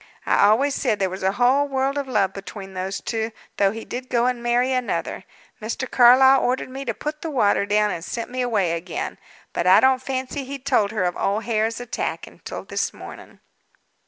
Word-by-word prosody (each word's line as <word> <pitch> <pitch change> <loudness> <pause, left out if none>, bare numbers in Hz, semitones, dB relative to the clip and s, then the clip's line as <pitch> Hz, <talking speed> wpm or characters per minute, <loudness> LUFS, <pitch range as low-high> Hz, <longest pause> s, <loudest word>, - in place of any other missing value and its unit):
I - - +4
always 270 +7 +3
said 215 - 0
there 190 -2 -1
was 190 - -6
a 190 +1 +1
whole 255 +5 +3
world 270 0 -1
of 285 -1 -2
love 200 -6 +1
between 195 0 -9
those 190 +1 -3
two; 225 0 -3 0.3
though 200 - +4
he 220 +2 -7
did 255 +1 -6
go 240 -1 +2
and 250 -1 0
marry 240 +2 +1
another. 195 -8 -2 0.4
Mr. 230 +4 -3
Carlyle 265 +2 +6
ordered 255 +1 -1
me 270 +1 -6
to 235 - -1
put 300 0 -5
the 325 - -4
water 210 -7 +2
down, 210 0 +2
and 165 - -5
sent 230 +5 -5
me 255 0 -2
away 210 -8 +1
again. 170 +1 -4 0.3
But 175 - -1
I 185 - +8
don't 260 -1 +3
fancy 260 +1 -3
he 275 +2 -6
told 255 -6 +1
her 210 -3 -1
of 175 -1 0
old 205 +3 0
Hare's 225 +1 0
attack 245 -1 -4
until - - -9
this - - -2
morning." - - -12
235 Hz, 205 wpm, -23 LUFS, 200-260 Hz, 0.4 s, I